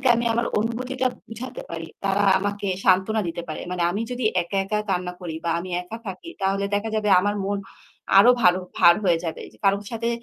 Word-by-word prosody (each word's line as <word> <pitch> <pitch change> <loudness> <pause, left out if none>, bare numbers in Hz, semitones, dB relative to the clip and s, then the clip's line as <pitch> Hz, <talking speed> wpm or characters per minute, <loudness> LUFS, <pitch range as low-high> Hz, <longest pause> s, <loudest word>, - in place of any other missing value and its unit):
আমি 235 - -1
আমার 235 +1 +1
অনুভূতিটা 255 +3 -1 0.2
বুঝাতে 235 +3 -7
পারি। 165 -1 -5 0.2
তারা 200 +1 +2 0.2
আমাকে 205 0 -3 0.2
সান্ত্বনা 190 +3 +3
দিতে 170 +1 -4
পারে। 155 - -5
মানে 180 -1 -1
আমি 205 +5 -2
যদি 245 -1 -3 0.2
একা, 185 +3 -4
একা 210 +1 -1
কান্না 180 -1 -1
করি 165 -3 -5
বা - - +1
আমি 185 - -7
একা 200 +6 -8
থাকি, 195 - -7
তাহলে 195 +1 +1
দেখা 210 +2 -1
যাবে 210 -1 0
আমার 205 +2 0
মন 200 0 -1 0.6
আরও 240 +5 +8
ভার 180 -6 +6 0.2
ভার 170 0 +7
হয়ে 175 -3 +3
যাবে। 165 - -4
যে - - -20
কারো 195 0 +4
সাথে 230 0 -1
200 Hz, 200 wpm, -24 LUFS, 180-225 Hz, 0.6 s, আরও